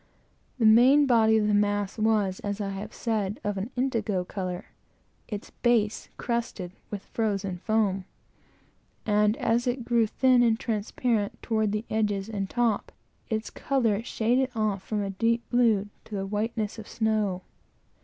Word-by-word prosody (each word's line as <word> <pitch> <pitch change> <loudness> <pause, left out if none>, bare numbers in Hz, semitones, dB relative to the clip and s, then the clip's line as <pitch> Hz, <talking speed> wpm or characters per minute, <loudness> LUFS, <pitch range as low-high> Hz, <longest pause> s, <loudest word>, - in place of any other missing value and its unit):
The 230 - +2
main 250 +7 +7
body 225 -4 +4
of 210 -1 +2
the 210 - +2
mass 205 0 +1
was, 210 -4 +2
as 205 0 -4
I 200 -1 -2
have 200 +2 -6
said, 210 -3 -2
of 205 -1 -1
an 200 +5 -4
indigo 225 -7 0
color, 185 -1 -5 0.6
its 210 -2 -6
base 225 -3 +1
crusted 235 -7 -3 0.2
with 200 -2 -5
frozen 195 -5 -2
foam; 200 -2 0 1.0
and 210 0 +3
as 235 +2 +1
it 245 -1 -1
grew 235 -2 +3
thin 255 +2 +4
and 230 -2 +3
transparent 220 0 -1
toward 220 -2 +1
the 210 +2 -2
edges 205 -2 0
and 200 -3 -3
top, 235 -4 0 0.4
its 220 -1 -2
color 230 -7 0
shaded 245 +3 +1
off 215 -3 0
from 210 +1 -2
a 195 - -3
deep 230 +4 0
blue 225 -5 +3 0.2
to 215 - -7
the 195 -1 -2
whiteness 215 +1 -2
of 215 - -9
snow. 215 -4 0
215 Hz, 155 wpm, -27 LUFS, 205-230 Hz, 1.0 s, main